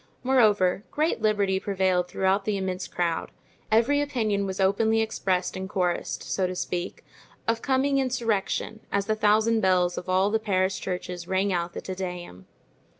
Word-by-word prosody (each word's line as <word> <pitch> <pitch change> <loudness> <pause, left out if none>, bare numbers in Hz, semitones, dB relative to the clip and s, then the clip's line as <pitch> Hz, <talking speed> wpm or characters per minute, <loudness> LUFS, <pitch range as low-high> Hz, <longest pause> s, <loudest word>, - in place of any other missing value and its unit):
Moreover, 210 -7 +3
great 305 -5 0
liberty 205 -3 +2
prevailed 185 -3 +1
throughout 190 +2 +1
the 210 -2 0
immense 185 -1 -3
crowd; 170 -2 -2 0.4
every 240 +7 +3
opinion 215 -8 0
was 190 0 -5
openly 220 +4 +3
expressed 190 -5 -1
and 190 0 -5
chorused, 180 -2 -1
so 190 -1 -1
to 185 - -4
speak, 180 0 -4 0.4
of 230 0 +1
coming 275 +1 +2
insurrection, 225 -4 -1
as 200 0 0
the 215 - +1
thousand 215 +2 +3
bells 180 -2 +2
of 180 - -10
all 190 +2 +3
the 220 - +2
Paris 190 -3 0
churches 180 -1 -5
rang 190 +1 +1
out 170 0 -2
the - - -5
Te 190 - -5
Deum. 180 - -6
195 Hz, 160 wpm, -26 LUFS, 185-220 Hz, 0.4 s, Moreover